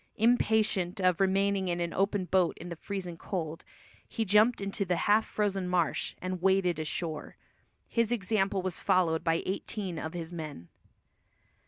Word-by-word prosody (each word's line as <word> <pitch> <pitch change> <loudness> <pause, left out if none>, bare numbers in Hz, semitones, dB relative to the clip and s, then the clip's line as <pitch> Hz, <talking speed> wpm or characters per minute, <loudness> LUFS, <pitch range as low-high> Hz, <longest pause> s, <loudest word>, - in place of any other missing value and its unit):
Impatient 215 -5 +2
of 185 -1 +2
remaining 195 0 +2
in 175 -1 -1
an 170 -1 -2
open 195 0 +1
boat 180 -2 +2
in 175 - -8
the 170 - -5
freezing 180 -1 -5
cold, 165 -4 -4 0.4
he 225 - -2
jumped 215 +4 +4
into 200 +1 -1
the 180 -2 0
half 210 +5 +3
frozen 195 -3 -1
marsh, 175 -3 0
and 185 -1 -4
waded 190 -2 +2
ashore. 155 0 -3 0.5
His 230 -1 +1
example 195 -3 0
was 185 -2 -3
followed 165 -3 +2
by 165 0 +1
eighteen 190 -2 -3
of 160 - -5
his 170 0 -5
men. 150 - -7
185 Hz, 155 wpm, -30 LUFS, 170-200 Hz, 0.5 s, jumped